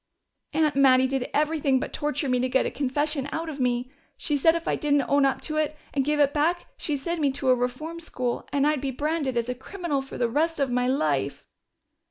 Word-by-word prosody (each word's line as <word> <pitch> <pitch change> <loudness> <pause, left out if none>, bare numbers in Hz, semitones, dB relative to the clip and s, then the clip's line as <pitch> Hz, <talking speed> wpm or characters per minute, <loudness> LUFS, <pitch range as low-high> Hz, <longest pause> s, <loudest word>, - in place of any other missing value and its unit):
"Aunt 305 -2 +2
Mattie 260 -2 +5
did 265 -1 -2
everything 295 -3 +2
but - - -5
torture 295 0 -1
me 250 -1 +2
to 255 +1 0
get 265 +1 +2
a - - -1
confession 290 +1 -1
out 325 +1 -3
of 290 -2 -7
me. 250 0 0 0.3
She 295 - -1
said 325 +4 +4
if 335 - -4
I - - +2
didn't 290 -2 +2
own 280 0 +4
up 270 - -1
to 310 -1 -2
it 305 0 0 0.2
and 275 - +1
give 300 +2 0
it 285 -1 +4
back 330 +4 +1
she'd 295 -2 -2
send 335 +4 -3
me 285 - +3
to 265 -1 -1
a 255 - +6
reform 255 +7 -3
school, 250 -7 -3
and 285 0 +2
I'd 300 -2 +1
be 275 - -2
branded 285 -1 -1
as 235 0 0
a 250 - -1
criminal 295 +2 -3
for 270 - -9
the 240 - +1
rest 310 +6 0
of 275 -3 +1
my 250 0 +1
life." 150 - 0
280 Hz, 235 wpm, -26 LUFS, 255-305 Hz, 0.3 s, a